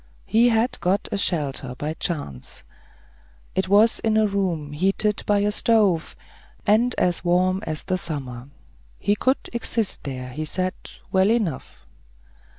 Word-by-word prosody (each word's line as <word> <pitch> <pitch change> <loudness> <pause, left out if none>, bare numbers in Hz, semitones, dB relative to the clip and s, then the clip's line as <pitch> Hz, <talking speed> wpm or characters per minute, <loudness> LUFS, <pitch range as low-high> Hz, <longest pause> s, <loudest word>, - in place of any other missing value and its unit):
He 235 +2 +4
had 230 +2 +1
got 190 +3 0
a 205 - -1
shelter 140 -8 0
by 150 +3 -3
chance. 145 - -5 0.9
It 190 0 -1
was 210 +3 +5
in 220 -1 +1
a 220 - +4
room 185 -7 -1
heated 195 +6 +1
by 205 -1 +3
a 205 +1 +1
stove, 205 -7 +2 0.5
and 230 +4 +3
as 175 -1 +1
warm 185 +2 +2
as 155 -1 -3
summer. 135 -7 -5 0.5
He 205 - +1
could 260 +5 0
exist 230 -2 -1
here, 130 -2 -5
he 155 +5 -5
said, 185 +4 -1 0.4
well 190 +1 +3
enough. 220 -7 -2
190 Hz, 140 wpm, -23 LUFS, 155-210 Hz, 0.9 s, was